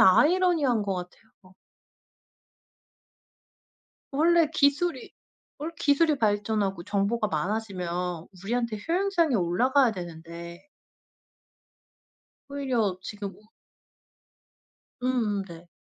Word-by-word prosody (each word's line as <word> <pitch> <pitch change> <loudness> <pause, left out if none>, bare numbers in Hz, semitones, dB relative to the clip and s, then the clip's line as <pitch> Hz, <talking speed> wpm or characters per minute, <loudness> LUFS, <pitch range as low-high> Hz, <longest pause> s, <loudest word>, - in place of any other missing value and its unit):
아이러니한 300 - +4
거 195 -1 -1
같아요. 185 +1 -10 2.6
원래 330 +3 +4
기술이 285 +1 +1 0.5
원래 310 +3 -4
기술이 295 +1 +3
발전하고 205 -4 0
정보가 210 +2 0
많아지면 180 -1 -2 0.2
우리한테 235 0 -1
효용성이 345 -5 +2
올라가야 230 +8 +3
되는데 170 - -9 1.8
오히려 250 -9 0
지금 205 -2 -6
우 210 - -21 1.6
음음 225 -6 0
네. 170 -1 -12
215 Hz, 205 characters per minute, -27 LUFS, 185-280 Hz, 2.6 s, 아이러니한